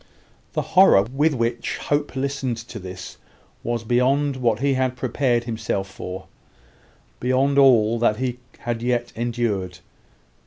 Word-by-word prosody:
The - - 0
horror 185 - +7
with 140 +7 +1
which 115 0 -1
Hope 145 0 -1
listened 135 -3 -2
to 115 0 -8
this 95 0 -8 0.4
was 120 -1 -2
beyond 135 +4 +2
what 120 -4 +1
he 140 +1 +2
had 130 -1 0
prepared 125 -2 0
himself 110 -4 -3
for 95 0 -7 0.9
beyond 135 +3 +2
all 120 -4 +5
that 110 -2 +2
he 125 0 -2 0.2
had 120 -1 -3
yet 120 -1 -1
endured. 110 -6 -2
120 Hz, 130 wpm, -23 LUFS, 115-135 Hz, 0.9 s, horror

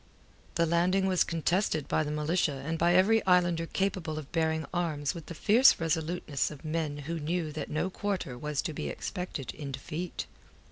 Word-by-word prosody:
The 170 - +3
landing 180 +4 +2
was 185 -2 +3
contested 165 -1 0
by - - +1
the 150 - -4
militia 150 +1 +1
and 165 +1 -2
by 175 +1 +4
every 215 +5 +5
islander 175 -2 +3
capable 185 -5 -1
of 150 -3 -7
bearing 160 -1 +1
arms 155 -5 -1
with 165 -4 -9
the 170 - -7
fierce 230 +10 +6
resoluteness 160 -2 -1
of 150 0 -11
men 155 -2 -1
who 165 +2 -3
knew 160 +1 -1
that 155 - -5
no 175 +5 -1
quarter 185 -10 -2
was 150 +3 -2
to 160 - -3
be - - -3
expected 180 -8 -5
in 145 -3 -6
defeat. 155 +6 -5
165 Hz, 180 wpm, -30 LUFS, 155-180 Hz, -, fierce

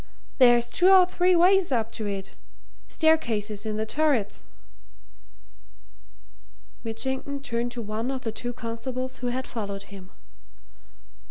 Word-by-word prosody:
There's 240 -2 +6
two 360 +9 +3
or 380 -1 +8
three 360 0 +2
ways 365 0 +4
up 230 -3 0
to 215 -2 -4
it 195 -1 -5 0.6
staircases 220 -10 +1
in 215 0 -2
the 220 - -1
turrets." 270 -5 0 2.4
Mitchington 265 +5 -3
turned 235 -2 -2
to 235 - -5
one 220 +3 -3
of 265 -1 -3
the 225 - -2
two 245 +2 -5
constables 245 +2 -5
who 250 - -4
had 255 +1 -2
followed 200 -3 -5
him. 190 -2 -12
240 Hz, 125 wpm, -26 LUFS, 220-275 Hz, 2.4 s, or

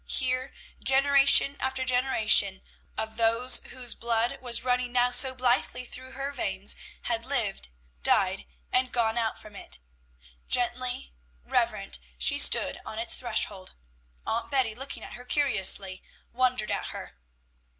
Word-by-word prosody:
Here 255 0 0 0.3
generation 275 +1 +5
after 260 0 -2
generation 220 -6 +3 0.3
of 220 0 -4
those 230 +2 +3
whose 250 -2 -2
blood 230 0 -1
was 240 -2 0
running 250 -1 0
now 245 0 +3
so 260 +1 +4
blithely 250 0 0
through 260 +1 -9
her 275 +1 -3
veins 195 -7 -1 0.3
had 230 -1 -2
lived, 230 - -2 0.3
died, - - +2 0.2
and 255 0 +1
gone 225 -2 +1
out 225 -2 -1
from 210 -1 -14
it. 65 - -7 0.7
Gently 245 - -2 0.3
reverent 65 +1 0 0.2
she 60 - +3
stood - - +3
on 220 - -8
its 230 +1 0
threshold. 215 -5 -2 0.5
Aunt 230 +1 -2
Betty, 260 -6 +1
looking 270 +5 -7
at - - -9
her 245 - -10
curiously, 195 -8 +1 0.3
wondered 250 -3 +1
at - - -2
her. 60 - -9
245 Hz, 135 wpm, -27 LUFS, 220-255 Hz, 0.7 s, generation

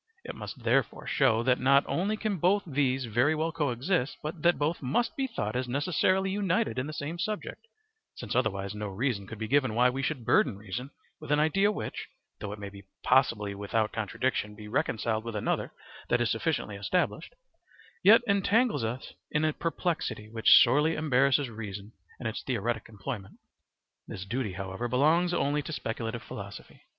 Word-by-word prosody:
It - - -6
must - - -8
therefore - - +1
show 120 -5 +2
that 125 0 +3
not 140 +2 +5
only 205 +5 -1
can 215 -3 -1
both 185 +5 +3
these 135 -4 0
very 120 +7 +2
well 160 +2 -1
co 150 -4 0
exist, 130 +4 -1
but 155 +1 -5
that 175 +2 +4
both 155 +3 -1
must 155 - 0
be 270 -3 -1
thought 110 - -3
as 125 0 -1
necessarily 180 +8 +1
united 200 - 0
in 130 - -2
the - - -5
same 155 +2 -5
subject, 215 - -4 0.5
since - - -5
otherwise 100 0 0
no 105 0 -4
reason 100 0 -2
could 115 - -8
be 110 +1 -4
given 130 -3 +2
why 125 +1 +4
we 135 +2 -3
should 135 -4 -2
burden 110 -3 +3
reason 105 +6 -6 0.3
with - - -7
an 150 - +4
idea 195 +7 +3
which, - - -5 0.3
though 100 - -5
it 105 - -6
may 100 -1 -7 0.3
possibly 115 -6 +3
without 105 +2 -1
contradiction 105 0 -2
be 105 0 -10
reconciled 110 -3 -1
with 115 -1 -5
another 105 - -1 0.4
that 120 - +3
is 120 -1 +1
sufficiently 115 -4 -1
established, 180 - -1 0.7
yet 215 +5 +7
entangles 205 - +2
us 120 +3 -4 0.2
in 150 0 +1
a 155 - +1
perplexity 165 - -2
which 115 -1 +7
sorely 150 +4 +2
embarrasses 140 -1 +2
reason 105 -2 -7 0.3
in - - -8
its 110 - -2
theoretic 120 -3 -2
employment. 105 -1 -7 0.7
This 95 - -6
duty, 110 -1 -2
however, 95 +5 -4
belongs 155 +8 +3
only 150 -4 +1
to 150 - -7
speculative 115 -4 -4
philosophy. - - -9
130 Hz, 175 wpm, -29 LUFS, 110-160 Hz, 0.7 s, yet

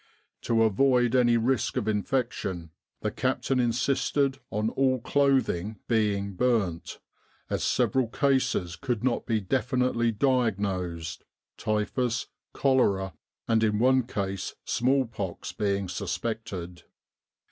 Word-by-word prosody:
To 115 -1 +2
avoid 120 +2 +3
any 120 -2 +4
risk 120 0 0
of 105 - -1
infection, 105 -6 -2 0.3
the - - -1
captain 135 -1 0
insisted 135 +3 +1
on 105 +2 -1
all 130 -1 +2
clothing 130 -7 +1
being 100 -3 +1
burnt, 100 -7 0 0.5
as - - -1
several 130 -3 +2
cases 125 -9 +1
could 115 +5 -3
not 125 -2 0
be 115 -2 +1
definitely 125 +2 +1
diagnosed, 95 - -1 0.3
typhus, 115 +3 -1 0.3
cholera, 100 - +2 0.3
and, 115 -1 +3
in 105 -1 +2
one 130 +3 +4
case, 100 -4 -3
smallpox 120 -7 -1
being 100 -2 -1
suspected. 90 -1 -4
115 Hz, 105 wpm, -27 LUFS, 100-130 Hz, 0.5 s, any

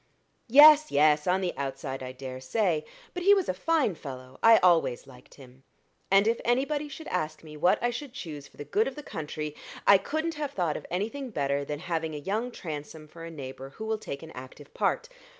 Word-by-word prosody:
"Yes, 300 +4 +8
yes, 150 +1 +3
on 185 +1 +2
the 180 -2 -2
outside, 135 -1 -4
I 130 0 -5
dare 130 0 -8
say. 160 +1 0 0.3
But 360 - -4
he 400 +3 +6
was 385 -3 0
a - - 0
fine 295 - +1
fellow 130 -4 -10
I 225 0 +8
always 170 -9 +3
liked 125 -1 -16
him. 130 -1 -16 0.5
And 195 +2 +5
if 230 +1 +1
anybody 280 +5 0
should 310 +3 -9
ask 155 -4 -3
me 155 -1 -11
what 175 +5 +3
I 240 - +2
should 255 +3 -6
choose 150 - -8
for - - -24
the 145 - -7
good 205 +10 +1
of 270 - -5
the 295 - -8
country, 150 - -5 0.3
I 200 - +7
couldn't 315 +6 -2
have 295 -2 -4
thought 170 -5 0
of - - -7
anything 225 +9 -3
better 140 -7 -1
than 145 +1 -4
having 160 -3 -2
a - - -3
young 210 +11 -2
Transome 155 -6 -7
for 165 +1 -10
a - - -7
neighbor 135 -3 -8
who 220 - -5
will 220 0 -1
take 140 -6 -7
an 160 - -10
active 130 +2 -11
part. 480 - 0
165 Hz, 215 wpm, -28 LUFS, 145-240 Hz, 0.5 s, Yes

